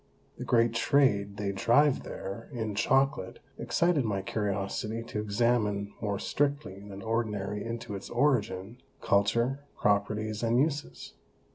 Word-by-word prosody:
The - - -4
great 115 -1 +3
Trade 105 -5 +2
they 100 -1 -1
drive 130 +8 +3
there 100 +4 -7
in 110 -5 -3
Chocolate, 135 -2 +1 0.2
excited 170 -5 +2
my 100 -4 -1
Curiosity 105 +2 -2
to 110 -2 -5
examine 105 -1 0
more 105 -2 -1
strictly 140 -8 -1
than 100 -1 -9
ordinary 105 -3 -2
into 115 -1 -5
its 100 - -6
Origin, 120 -4 0 0.2
Culture, 115 +7 +2 0.2
Properties, 105 +1 0
and 120 +1 +2
Uses. 140 - -2
110 Hz, 125 wpm, -29 LUFS, 100-120 Hz, 0.2 s, great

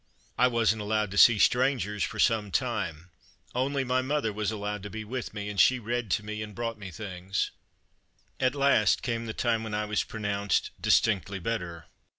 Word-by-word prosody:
I 125 - +4
wasn't 115 -3 +1
allowed 105 -1 0
to 105 - -4
see 120 -2 +8
"strangers" 120 -4 +2
for - - -3
some 110 -3 +2
time; 85 -1 -2 0.4
only 135 +2 0
my 130 0 +1
mother 130 -4 -1
was 105 -1 -1
allowed 105 -1 -4
to 105 - -7
be 110 +2 -6
with 125 +3 -5
me, 105 -1 -5
and 105 -1 -4
she 130 - +6
read 120 -1 -3
to 90 +5 0
me 105 0 -5
and 105 -1 -7
brought 115 -2 -3
me 100 -2 -7
things. 95 -1 -3 0.9
At 130 +1 +1
last 140 -6 +3
came 115 -1 -2
the 110 - -4
time 115 -2 0
when 110 -2 -4
I 105 0 -1
was 105 -1 0
pro 110 - -8
nounced 100 -1 0
"distinctly 100 -2 +2
better." 90 -5 -4
110 Hz, 190 wpm, -28 LUFS, 100-120 Hz, 0.9 s, see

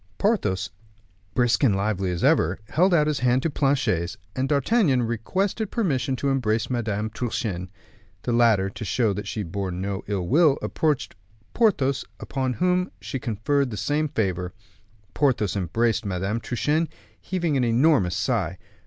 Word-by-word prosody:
Porthos, 105 - 0 0.6
brisk 120 +2 +2
and 110 -8 +4
lively 100 -1 -1
as 90 -2 -3
ever, 85 +4 +3
held 185 +5 +3
out 160 -4 +4
his 150 -2 0
hand 125 +1 +2
to 165 - 0
Planchet's, 115 - 0 0.2
and 130 +1 -1
D'Artagnan 140 - +3
requested 185 - -1
permission 140 - 0
to 140 +2 -1
embrace 115 -4 0
Madame 110 -3 -1
Truchen. 110 -6 -3 0.5
The 120 - -1
latter, 115 -5 +4
to 110 - -7
show 110 0 +1
that 105 +2 -5
she 105 - -3
bore 95 +2 -3
no 95 +2 -3
ill 95 -4 -2
will, 150 - +4
approached 155 -4 0 0.4
Porthos, 140 - +2 0.2
upon 130 -1 -2
whom 180 +4 +1
she 135 - -5
conferred 125 +5 0
the 105 - -5
same 150 +5 0
favor. 90 - -2 0.6
Porthos 125 -9 +1
embraced 110 +5 0
Madame 100 +2 -2
Truchen, 150 +8 0 0.3
heaving 170 -5 -1
an 130 - +2
enormous 120 - +3
sigh. - - -1
120 Hz, 150 wpm, -24 LUFS, 100-145 Hz, 0.6 s, and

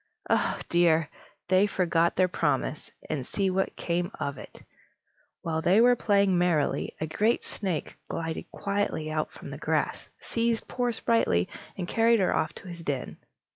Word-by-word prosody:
Oh - - +2
dear! 165 -3 +3 0.4
they 190 +3 +4
forgot 170 -3 +1
their 185 0 +4
promise, - - -1 0.2
and 140 - -2
see 195 +8 0
what 190 +1 0
came 175 +1 -1
of 140 -1 -3
it! - - -12 0.8
While 160 -1 -1
they 185 +6 +4
were 245 +1 +6
playing 200 -5 +3
merrily, 170 -5 +1
a 155 - -1
great 215 +9 +1
snake 185 -7 -3
glided 165 -1 -4
quietly 200 -6 -2
out 155 0 -1
from - - -10
the - - -7
grass, - - -1
seized 230 -1 -1
poor 245 -1 0
Sprightly, 220 - +2 0.3
and 180 -2 -3
carried 230 +2 +4
her 190 - +2
off 155 - 0
to - - -11
his 170 -1 -8
den. 140 -5 -3
180 Hz, 160 wpm, -28 LUFS, 160-205 Hz, 0.8 s, were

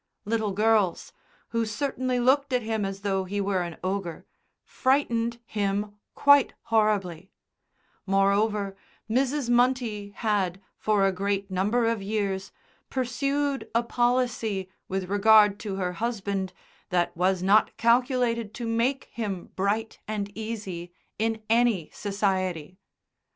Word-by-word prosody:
Little 220 -1 0
girls 210 -2 +1 0.4
(who 230 0 0
certainly 255 +2 -1
looked 275 +3 +3
at 250 -2 +1
him 220 -2 -1
as 195 0 -5
though 195 -1 0
he 200 +2 -3
were 195 -2 0
an 170 -2 -5
ogre) 185 -3 -3 0.4
frightened 235 -4 +1
him 205 -1 -1 0.2
quite 285 -1 +5 0.2
horribly; 195 -5 +1 0.8
moreover, 200 +1 +2 0.3
Mrs. 265 +3 0
Munty 240 -4 +1
had, 200 -3 -1 0.2
for 210 -2 +2
a 195 - +3
great 195 +1 -2
number 210 +6 +1
of 225 -2 0
years, 195 -2 -2 0.4
pursued 275 +2 -1
a 235 - +3
policy 235 -6 0 0.2
with 190 -1 -3
regard 205 +1 +5
to 205 -4 -4
her 180 -2 -2
husband 200 -3 -2 0.4
that 175 -1 0
was 180 +1 +1
not 205 +3 +4
calculated 235 -2 +2
to 240 - -4
make 235 +4 0
him 200 -6 -4
bright 210 +4 -1
and 205 -1 -4
easy 205 -6 -5 0.3
in 225 0 -1
any 225 -7 +2
society. 185 -4 -2
210 Hz, 125 wpm, -26 LUFS, 195-235 Hz, 0.8 s, quite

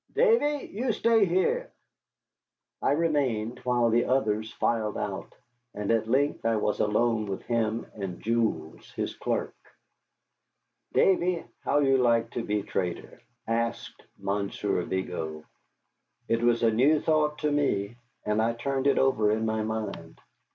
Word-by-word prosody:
Davy, 430 - +3
you 235 +3 0
stay 225 -1 +3
here." 190 - +1 1.1
I - - +2
remained, 130 -8 0
while 120 -2 +1
the 120 +1 +3
others 110 -4 0
filed 110 -2 -1
out, 95 -2 -5 0.4
and 105 0 -2
at 110 -1 +1
length 140 +4 +1
I 115 0 +2
was 105 -1 0
alone 110 +1 +1
with 95 -1 -4
him 115 -1 -1
and 95 -4 -6
Jules, 110 -9 -2
his - - -3
clerk. - - -2 1.4
"Davy, 180 -2 +2
how 145 - +1
you 135 -1 +3
like 115 -2 +2
to 120 - -3
be 105 -2 -1
trader?" 90 -3 -4 0.2
asked 115 +1 -2 0.2
Monsieur 100 0 -1
Vigo. 80 -4 -4 0.8
It 115 0 +1
was 120 0 +2
a 115 - +5
new 140 +8 +4
thought 150 -1 +1
to 150 -1 +1
me, 120 -7 0 0.3
and 105 +1 +1
I 115 +1 +1
turned 135 +3 -1
it 140 - +3
over 115 -6 +3
in 110 +1 +1
my 110 0 0
mind. 110 -1 -5
115 Hz, 140 wpm, -27 LUFS, 105-140 Hz, 1.4 s, a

